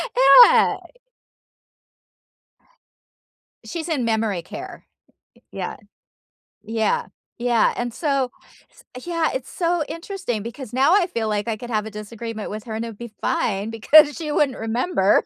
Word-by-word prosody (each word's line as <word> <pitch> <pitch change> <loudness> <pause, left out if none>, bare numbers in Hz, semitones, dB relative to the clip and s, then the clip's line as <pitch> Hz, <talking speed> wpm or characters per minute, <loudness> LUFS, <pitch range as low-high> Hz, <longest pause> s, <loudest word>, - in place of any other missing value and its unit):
Yeah. - - +7 2.9
She's 335 0 -5
in 280 -6 0
memory 220 -5 0
care. - - -9 0.7
Yeah, - - -5 0.9
yeah, 225 - -1 0.3
yeah, 240 -1 +2
and 240 -1 -3
so 275 -5 -1 0.6
s 250 - -9
yeah, 335 -2 0
it's 260 -1 -5
so 345 -2 0
interesting 335 - -4
because 235 0 -8
now 275 +7 +4
I 375 -3 +3
feel 230 -9 -3
like 205 +1 -2
I 225 - -1
could 240 +2 -9
have 215 -2 -1
a 220 - -7
disagreement 215 +1 -7
with 210 0 -6
her 220 - -6
and 225 - -3
it'd 225 -3 -8
be 235 -1 -9
fine 200 0 -1
because 290 +7 +5
she 310 -3 -4
wouldn't 290 -3 +1
remember. 225 - +1
240 Hz, 140 wpm, -22 LUFS, 220-310 Hz, 2.9 s, Yeah